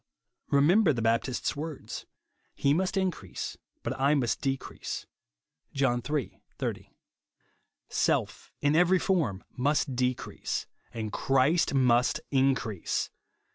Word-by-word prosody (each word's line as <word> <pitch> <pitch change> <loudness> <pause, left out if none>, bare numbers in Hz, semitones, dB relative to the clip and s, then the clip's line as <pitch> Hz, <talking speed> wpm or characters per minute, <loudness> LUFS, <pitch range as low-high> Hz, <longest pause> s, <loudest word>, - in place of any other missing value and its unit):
Eemember 155 +4 +5
the 115 - -2
Baptist's 115 +4 +1
words, 150 0 -6 0.5
"He 140 - +3
must 185 +4 0
increase, 190 -3 -2 0.3
but - - -1
I 140 +3 +4
must 125 -5 0
decrease," 135 -1 -3 0.7
(John 130 -3 +2
iii. 140 -10 -2 0.2
80). - - -4 0.9
Self, - - 0
in 145 +1 +3
every 180 +2 +5
form, 155 - 0
must 135 0 0
decrease, 125 0 -2 0.3
and 110 -2 -4
Christ 140 +4 +2
must 125 -2 +3
increase. 130 - +1
135 Hz, 105 wpm, -29 LUFS, 125-155 Hz, 0.9 s, Eemember